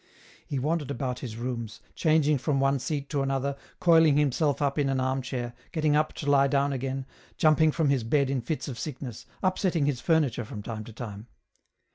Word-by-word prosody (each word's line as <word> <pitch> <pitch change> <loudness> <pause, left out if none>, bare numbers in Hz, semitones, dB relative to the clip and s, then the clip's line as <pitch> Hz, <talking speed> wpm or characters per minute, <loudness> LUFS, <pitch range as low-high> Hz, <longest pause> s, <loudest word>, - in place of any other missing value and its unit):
He 140 - -2
wandered 150 +2 -1
about 125 -2 -3
his 115 -4 -6
rooms, 120 -2 -4
changing 155 -3 +3
from 140 +1 0
one 135 0 +2
seat 140 +2 -3
to 145 - +1
another, 135 0 -1 0.2
coiling 160 -4 +5
himself 145 0 +2
up 140 0 0
in 140 -1 +2
an 135 -1 0
arm 130 +1 0
chair, 120 -1 -4 0.2
gettmg 155 -3 +2
up 155 +1 +2
to - - -7
lie 140 -1 +5
down 140 0 +1
again, 135 0 -3 0.3
jumping 155 0 +4
from 155 -2 +1
his 135 -4 +1
bed 135 +3 +2
in 135 -2 0
fits 150 +7 -3
of 125 -4 -6
sickness, 135 -6 -6 0.2
upsetting 185 -4 +1
his 140 -4 -1
furniture 150 -8 +2
from 105 -1 -8
time 110 -1 -5
to 115 - -10
time. 110 -2 -7
140 Hz, 195 wpm, -27 LUFS, 125-150 Hz, 0.3 s, coiling